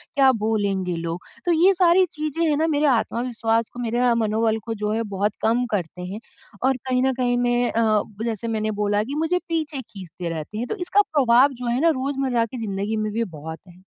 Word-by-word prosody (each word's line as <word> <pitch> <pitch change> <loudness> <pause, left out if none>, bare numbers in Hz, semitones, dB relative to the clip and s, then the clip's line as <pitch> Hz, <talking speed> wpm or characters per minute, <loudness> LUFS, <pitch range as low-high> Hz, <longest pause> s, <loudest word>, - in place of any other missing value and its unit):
क्या 270 -1 +6
बोलेंगे 200 -4 0
लोग? 165 +1 -4 0.2
तो 350 - +2
ये 345 +4 +5
सारी 365 0 +4
चीज़ें 310 0 -3
हैं 295 - +2
ना 320 +2 +2
मेरे 300 -1 +1
आत्मविश्वास 230 -2 0
को, 245 - -9
मेरे 240 +1 +1
मनोबल 220 0 +1
को 225 - -2
जो 210 -1 -2
है 225 +1 0
बहुत 200 +2 0
कम 235 +3 +2
करते 180 -3 -3
हैं 185 +4 -5 0.5
और 265 -1 +3
कहीं 255 0 +2
न 265 0 +2
कहीं 245 -1 0
मैं 245 0 +1
अ, 220 -2 +2 0.2
जैसे 230 -1 -3
मैंने 215 -1 -1
बोला 205 0 +1
कि 270 +6 -5
मुझे 325 +4 +1
पीछे 310 -4 -2
खींचते 185 -5 -8
रहते 165 +5 -5
हैं। 240 +3 -3
तो - - -3
इसका 385 +1 +2
प्रभाव 265 -1 +5
जो 245 - -3
है 240 +1 +1
ना 335 - +5
रोज़मर्रा 265 -4 0
की 240 +3 -8
ज़िंदगी 200 +2 -2
में 215 0 -1
भी 230 +1 0
बहुत 160 -4 -8
है। 180 +1 -17
230 Hz, 210 wpm, -23 LUFS, 210-270 Hz, 0.5 s, क्या